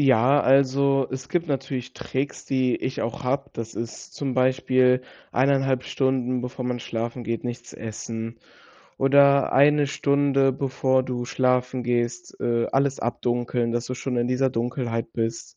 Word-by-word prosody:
Ja, 135 +1 +4
also, 135 0 +3
es 130 0 -6
gibt 175 -2 -1
natürlich 135 -2 -3
Tricks, 135 +2 -4
die 130 -2 +1
ich 130 - -3
auch 120 +4 -4
habe. 135 +2 -1
Das 115 0 -6
ist 115 -1 -7
zum 135 -2 -3
Beispiel 130 0 +3 0.3
1,5 135 0 +2
Stunden, 130 -2 0
bevor 125 +1 -5
man 125 0 -2
schlafen 115 +1 -4
geht, 115 0 -3
nichts 120 0 -6
essen 115 +1 -6 0.6
oder 140 0 +5
1 145 +1 +5
Stunde, 140 -1 +2
bevor 130 0 +1
du 125 -1 -3
schlafen 125 0 0
gehst, 120 0 -2
äh, 115 -1 +1
alles 135 0 +1
abdunkeln, 120 0 -1
dass 120 0 -2
du 130 - -4
schon 125 0 -3
in 120 0 +1
dieser 130 +1 +1
Dunkelheit 115 -1 -2
bist. 115 0 -3
130 Hz, 150 wpm, -24 LUFS, 120-135 Hz, 0.6 s, oder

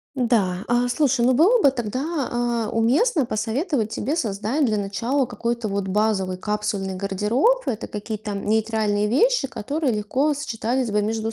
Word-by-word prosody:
Да. 230 -8 +1
А, 240 +1 +2
слушай, 255 -1 +2
ну, 255 - +4
было 375 - +4
бы 280 - +6
тогда, 265 +5 -3
а, 240 -2 -1
уместно 275 - +2
посоветовать 230 - -1
тебе 275 +6 -2
создать 225 0 -1
для 215 -2 0
начала 220 +7 -1
какой-то 235 -2 -3
вот 200 -1 -2
базовый 195 -2 0
капсульный 200 -1 -2
гардероб. 210 - +1
Это 225 -1 -2
какие-то 210 0 -5
нейтральные 210 0 0
вещи, 300 - +2
которые 275 +3 -2
легко 260 +8 0
сочетались 250 -3 -2
бы 210 0 +1
между 220 +1 -2
230 Hz, 150 wpm, -23 LUFS, 210-270 Hz, -, бы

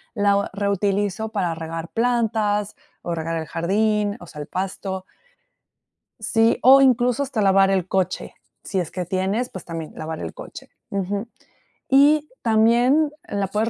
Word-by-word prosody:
la 200 -1 +2
reutilizo 200 +1 -1
para 180 -5 0
regar 165 +1 -6
plantas 220 -2 0 0.3
o 175 - -3
regar 165 0 -3
el 160 -1 -3
jardín, 205 +4 0
o 175 - -11
sea, 150 - -11
el 145 - -7
pasto. 190 0 -4 1.2
Sí, 225 0 +2
o 270 +2 +8
incluso 250 0 +3
hasta 260 -5 -2
lavar 195 -1 +4
el 190 -2 0
coche, 190 -1 -2 0.3
si 190 - -2
es 175 -3 -3
que 180 -1 -4
tienes, 195 +7 -1
pues, 185 - -9
también 165 -2 -6
lavar 160 0 -5
el 80 - -6
coche, - - -11 0.2
ujú. 200 +3 -3 0.6
Y 295 +3 +5
también 240 +7 +3 0.2
la 200 -1 -2
puedes 210 +4 -1
200 Hz, 150 wpm, -22 LUFS, 185-225 Hz, 1.2 s, o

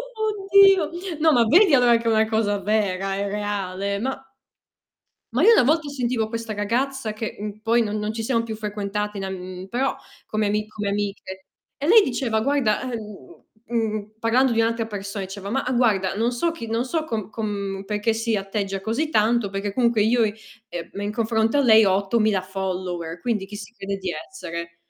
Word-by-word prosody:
Oddio, 395 -5 +4 0.3
no, 315 0 +5
ma 240 -4 +4
vedi 340 - +5
allora 245 -2 +6
che 230 - -7
è 230 - -2
una 220 0 +3
cosa 215 -2 0
vera, 195 -1 0
è 200 +1 -2
reale, 200 -1 -2
ma 265 +4 -3 1.1
ma 260 +8 +2
io 450 - +8
una 450 - +6
volta 305 +2 +2
sentivo 240 -5 -1
questa 230 -1 -4
ragazza, 230 +3 -1
che, 215 +1 -5
mhmm, 210 0 -6
poi 230 +2 +2
non 215 -1 -2
non 210 +1 -2
ci 225 0 -4
siamo 230 -1 +1
più 225 -1 -5
frequentate 210 -1 -3
in 195 - -3
am 190 - -4
mhmm, 185 0 -7
però 255 +6 0 0.3
come 215 -1 -1
ami 210 +1 -1
come 210 -1 -5
amiche 200 -2 -4 0.3
e 285 - -3
lei 435 +5 +8
diceva: 240 - -1
"Guarda 265 -4 +1
ehm" 215 - -8 0.3
Mhmm, 215 -3 -2
parlando 240 +3 +3
di 225 - +3
un'altra 230 0 0
persona 200 -1 -5
diceva: 195 +1 -7
"Mah 255 +2 -1
guarda, 205 -6 +2
non 230 +4 +1
so 290 +8 0
chi, 330 -9 -7
non 230 +2 -1
so 315 +4 -1
com 220 -9 -4
com 200 -3 -4
perché 210 +2 0
si 225 -1 0
atteggia 195 0 -3
così 230 +10 -1
tanto, 220 -3 +2
perché 195 +1 -3
comunque 235 -1 +2
io, 230 +2 +3
ehm, 215 -3 -6
in 205 +1 -2
confronto 225 +2 +1
a - - +4
lei 220 -4 +7
ho 195 - +4
8000 200 0 +1
followers, 185 -3 -4
quindi 220 -3 -1
chi 205 +1 -9
si 210 +3 -10
crede 200 -4 -4
di 190 -1 -4
essere?" 170 - -7
220 Hz, 190 wpm, -23 LUFS, 200-240 Hz, 1.1 s, io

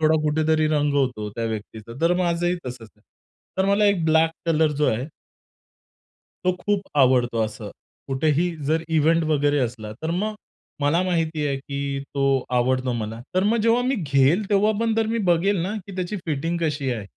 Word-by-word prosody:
थोडा 155 0 +4
कुठेतरी 155 +1 +2
रंगवतो 140 -7 0
त्या 115 - -2
व्यक्तीचा. 110 +1 -6
तर 170 +2 +3
माझंही 175 0 0
तसंच 120 -3 -7
आहे. 105 - -30 0.6
तर 190 - +3
मला 200 +1 +3
एक 200 -5 +2
ब्लॅक 160 0 +4 0.2
कलर 160 -1 +3
जो 150 - +4
आहे 125 +5 -3 1.4
तो 185 - +3
खूप 205 +1 0 0.2
आवडतो 125 -3 +3
असं. 110 -1 -7 0.4
कुठेही 155 +5 +1 0.2
जर 160 +2 +1
इव्हेंट 160 +1 +3
वगैरे 145 -1 +2
असला, 115 -4 -3
तर 160 - -2
मग 210 +5 -1 0.5
मला 155 +5 +2
माहिती 165 -4 0
आहे 140 -1 -1
की 140 0 -4
तो 140 - 0 0.4
आवडतो 130 0 +1
मला. 115 0 -4
तर 185 - +3
मग 225 +3 +3
जेव्हा 230 +2 +3
मी 260 +2 +1
घेईल, 150 - +2
तेव्हा 210 +2 +3
पण 225 -1 +1
जर 225 -1 +1
मी 230 +1 -1
बघेल 190 +4 +2
ना, 200 +4 -2
की 195 - -9
त्याची 185 +3 -3
फिटिंग 165 +3 -1
कशी 145 -4 -1
आहे? 110 -4 -5
155 Hz, 175 wpm, -23 LUFS, 130-180 Hz, 1.4 s, थोडा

